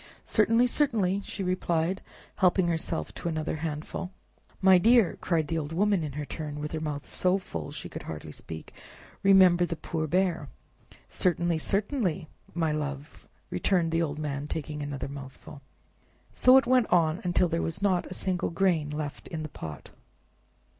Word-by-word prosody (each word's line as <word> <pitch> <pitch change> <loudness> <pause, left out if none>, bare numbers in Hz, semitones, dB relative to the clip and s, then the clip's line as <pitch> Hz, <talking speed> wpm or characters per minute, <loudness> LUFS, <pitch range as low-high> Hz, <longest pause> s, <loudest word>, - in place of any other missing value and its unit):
"Certainly, 230 +2 +4
certainly," 220 -8 +1
she 195 - -5
replied, 180 0 0 0.4
helping 185 -1 +3
herself 165 -1 -2
to 170 - -4
another 155 -1 -2
handful. 155 +3 -4 0.5
"My 190 -1 +6
dear," 230 0 +5
cried 165 -4 +1
the 165 +2 -1
old 150 0 -5
woman 200 0 +2
in 150 -3 -4
her 150 +1 -4
turn, 150 -1 -6
with 150 0 -4
her 160 - -2
mouth 150 -2 -4
so 185 +1 +1
full 85 - -6
she - - -6
could - - -7
hardly 75 -1 -7
speak, 80 +1 -9 0.5
"remember 185 -3 +6
the 170 -1 -1
poor 155 0 -3
Bear!" 175 -3 0 0.6
"Certainly, 175 -2 +1
certainly, 195 - -1 0.3
my 165 -2 +1
love!" 145 -1 -5 0.2
returned 165 - +1
the 165 +1 +1
old 150 -3 -2
man, 145 -1 -3
taking 150 -1 -4
another 145 -2 -4
mouthful. 140 0 -10 0.7
So 255 +1 +7
it 265 - +4
went 255 -2 +4
on, 170 -1 +2
till 180 - +4
there 165 0 -1
was 165 +4 -2
not 185 -3 +2
a 185 - -7
single 185 -1 -1
grain 165 -4 +1
left 150 -1 -5
in 160 -2 -5
the 155 - -5
pot. 80 - -8
165 Hz, 165 wpm, -28 LUFS, 150-185 Hz, 0.7 s, So